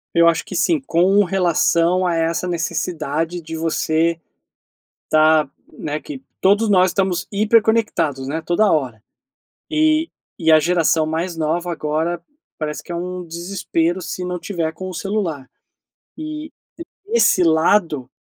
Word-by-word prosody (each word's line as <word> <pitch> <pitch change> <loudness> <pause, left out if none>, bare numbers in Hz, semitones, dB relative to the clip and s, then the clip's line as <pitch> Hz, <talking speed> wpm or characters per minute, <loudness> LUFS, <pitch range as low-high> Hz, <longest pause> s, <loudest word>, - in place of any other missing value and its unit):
Eu 170 0 +6
acho 165 -1 +1
que - - -6
sim, 325 -4 +2
com 195 -2 +3
relação 180 -1 +2
a 175 - +1
essa 165 +2 -1
necessidade 165 0 -2
de 160 0 -7
você 165 +1 0 0.9
tá, 155 -2 +4 0.2
né, 150 0 -4
que 275 -3 -9 0.2
todos 205 +3 +3
nós 185 -2 +4
estamos 190 -3 -1
hiperconectados, 210 - +1
né, 160 +4 -3
toda 200 +4 +2
hora 125 -8 -1 0.7
e 310 +1 +2 0.3
e 160 - +3
a 155 - +8
geração 165 0 +2
mais 165 +2 -3
nova 165 +3 -1
agora, 160 +1 -2 0.4
parece 150 -1 -4
que - - -16
é - - -3
um 180 +1 -5
desespero 170 0 -2
se 180 0 -5
não 180 0 -3
tiver 170 -3 -3
com 185 +4 -7
o 185 - -7
celular 170 -8 -3 0.7
e, 310 0 -6 0.6
esse 455 - +3
lado, 160 -4 +2
170 Hz, 140 wpm, -20 LUFS, 160-190 Hz, 0.9 s, a